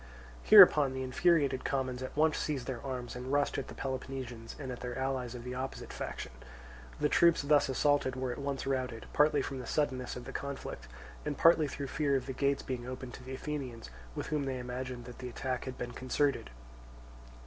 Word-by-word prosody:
Hereupon 135 - +8
the 130 0 -3
infuriated 140 0 +2
commons 130 -2 -1
at 130 - -6
once 155 0 +4
seized 140 -5 -2
their 125 -3 -4
arms 125 -3 -5
and 125 +1 -5
rushed 145 0 +1
at 135 - -5
the - - -9
Peloponnesians 130 -3 -5
and 135 -4 -5
at 125 - -6
their 125 -1 -5
allies 130 -2 -2
of 120 - -7
the 125 +1 -5
opposite 130 +1 -5
faction. - - -5 0.7
The 150 - +3
troops 170 0 +4
thus 145 0 +4
assaulted 140 -1 +2
were 130 -1 -2
at 120 - -5
once 140 -1 -3
routed, 130 -4 -2
partly 150 -1 +4
from 135 -2 -4
the 125 - -7
suddenness 130 -5 -1
of 125 - -7
the - - -7
conflict 140 - -5 0.4
and 150 -2 -3
partly 165 -2 +6
through 140 0 -5
fear 140 +1 0
of 130 -2 0
the 135 - -4
gates 140 +1 +1
being 125 -2 -4
opened 130 0 -6
to - - -10
the 130 +1 -6
Athenians, 130 - -5 0.2
with - - -3
whom 145 -2 0
they 130 -1 -2
imagined 125 0 -5
that 125 0 -10
the 125 - -5
attack 130 +1 -3
had 130 -1 -6
been 120 0 -4
concerted. 130 +2 0
130 Hz, 205 wpm, -32 LUFS, 125-140 Hz, 0.7 s, Hereupon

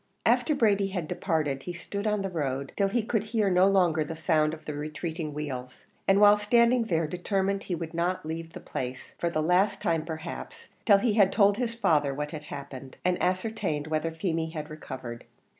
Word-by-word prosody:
After 305 - +3
Brady 205 -6 +3
had 180 -5 -3
departed 155 -8 -1
he 175 - -5
stood 200 +4 -4
on 210 -1 +1
the 195 - -2
road, 140 -4 -2
till 200 - +2
he 225 +3 0
could 220 -1 0
hear 215 -3 +1
no 180 +1 +5
longer 175 -5 +3
the 160 +2 -6
sound 155 -2 +2
of 155 -1 -9
the 150 - -4
retreating 155 +2 -4
wheels, 130 -4 -6 0.2
and 195 +1 +5
while 205 0 +7
standing 235 +3 +4
there 165 -5 +1
determined 195 +4 -1
he 180 - -2
would 165 0 -6
not 175 0 -1
leave 165 +1 -5
the - - -7
place, 130 0 -6
for 170 - +1
the 155 -2 -1
last 195 +4 +3
time 165 -2 0
perhaps, 160 +1 -7 0.2
till 200 -3 +8
he 215 +2 +1
had 200 -3 +5
told 200 -1 +4
his 235 -2 -2
father 150 -11 +2
what 150 +1 -3
had 150 -2 -7
happened, 135 -2 -8
and 180 0 +1
ascertained 185 -5 -1
whether 155 +1 -1
Feemy 165 -1 -2
had 155 -1 -6
recovered. 130 -6 -7
170 Hz, 200 wpm, -28 LUFS, 155-200 Hz, 0.2 s, till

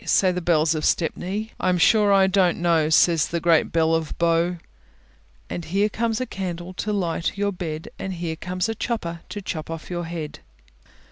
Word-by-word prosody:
Say 185 -2 +3
the 180 0 -3
bells 165 -2 +3
of 155 -1 -3
Stepney. 195 +6 -1
I 185 - +1
am 180 - +2
sure 210 +3 +4
I 195 -1 +6
don't 190 -2 +2
know, 165 -3 +2
Says 160 -1 +4
the 170 - -2
great 165 -1 +3
bell 165 0 +2
of 160 -1 -1
Bow. 170 +1 +2 0.9
_Here 195 +5 -1
comes 225 +1 -1
a 255 - -1
candle 180 -4 -5
to 210 +3 -3
light 175 -4 -1
you 205 - 0
to 200 - +1
bed, 165 -4 -5
And 190 - -4
here 170 -2 -3
comes 180 +4 -2
a 225 - -1
chopper 210 -7 -3
to 205 - -6
chop 160 -4 -5
off 165 +1 -7
your 175 -1 -3
head. 165 -2 -6
175 Hz, 195 wpm, -23 LUFS, 165-195 Hz, 0.9 s, I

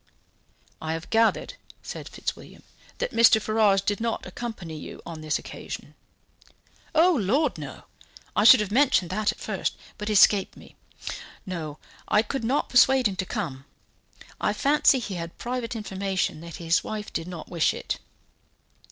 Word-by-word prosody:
"I 160 0 -2
have 165 0 -6
gathered," 225 - +2 0.3
said - - -7
Fitzwilliam, - - -6 0.3
"that - - -2
Mr. 230 -1 +6
Ferrars 215 -2 +3
did 205 +2 -1
not 230 -1 -2
accompany 200 -9 -6
you 155 - -8
on 165 -2 -7
this 155 -1 0
occasion." - - -8 1.0
"Oh, 345 +3 +6
Lord, 265 - +1
no! - - -8 0.5
I 210 - +3
should 215 - +9
have 205 -2 -3
mentioned 240 -8 +3
that 210 +2 +1
at - - -13
first, - - -2 0.2
but 210 +1 -3
it - - +1
escaped 200 -1 +5
me. - - -15 0.7
No, 160 -5 -5 0.3
I 210 - +4
could 265 +3 -4
not 260 +6 +1
persuade 255 0 +5
him 195 - -4
to 185 - -2
come. 135 -4 -4 0.7
I - - +1
fancy 285 -1 +4
he 210 -5 -4
had 165 0 -8
private 245 -1 -3
information 195 -6 -2
that 170 0 -8
his 170 0 +1
wife 215 -1 -5
did 165 +1 -3
not 175 -3 -8
wish 170 -3 +2
it." - - -4
210 Hz, 160 wpm, -26 LUFS, 170-235 Hz, 1.0 s, should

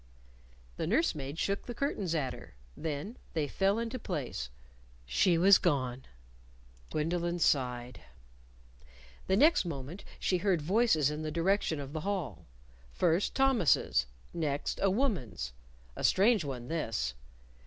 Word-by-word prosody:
The - - -2
nurse 260 - +2
maid 140 0 -6
shook 200 +3 -1
the 240 - -5
curtains 205 - -1
at 135 -5 -1
her. - - -12 0.2
Then 160 - -4 0.2
they 155 -3 0
fell 195 +7 +1
into 235 +2 -3
place. 60 - -4 0.6
She 170 - +3
was 190 +3 +7
gone. 130 -6 0 0.8
Gwendolyn 170 +3 -1
sighed. 125 -6 0 1.3
The 190 - +3
next 310 +8 +5
moment 160 +2 -6 0.2
she 180 - +1
heard 190 -2 +2
voices 160 - +3
in 150 +1 -4
the 155 - -3
direction 170 0 +1
of 140 0 -7
the 155 - -3
hall 170 - -3 0.4
first, 170 - +1
Thomas's; 250 - +3 0.3
next, 150 -4 -2
a 195 - +4
woman's 185 - -1 0.4
a - - -6
strange 210 0 +4
one 125 -4 -5
this. 115 - -2
165 Hz, 130 wpm, -31 LUFS, 140-200 Hz, 1.3 s, was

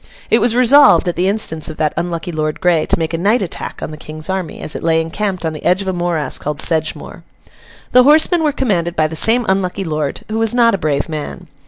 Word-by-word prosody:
It 230 - +5
was 235 -1 +2
resolved, 255 -3 +5
at 175 - -1
the 180 +2 0
instance 195 -7 0
of 155 - -8
that 155 -2 0
unlucky 170 +1 -3
Lord 155 -1 -3
Grey, 175 -3 +1
to - - +1
make 165 0 -3
a 165 - -2
night 205 +5 +1
attack 175 - -5
on - - -5
the 155 - -9
King's 155 +3 -7
army, 185 -4 -4
as - - -6
it - - -5
lay 165 0 +2
encamped 185 +2 -3
on 160 - -2
the 155 - -9
edge 185 +2 +2
of - - -9
a 190 - -1
morass 175 -6 -2
called 150 -1 -4
Sedgemoor. 160 -2 -1 0.7
The 250 - +6
horsemen 315 +5 +4
were 300 - +2
commanded 180 -11 -1
by 155 - +2
the 155 +1 -4
same 230 +8 +3
unlucky 190 0 -1
lord, 155 -4 -3
who 220 +1 -3
was 225 +1 0
not 235 -1 +4
a 195 - -1
brave 145 -3 -1
man. 155 +3 -6
175 Hz, 240 wpm, -16 LUFS, 155-215 Hz, 0.7 s, The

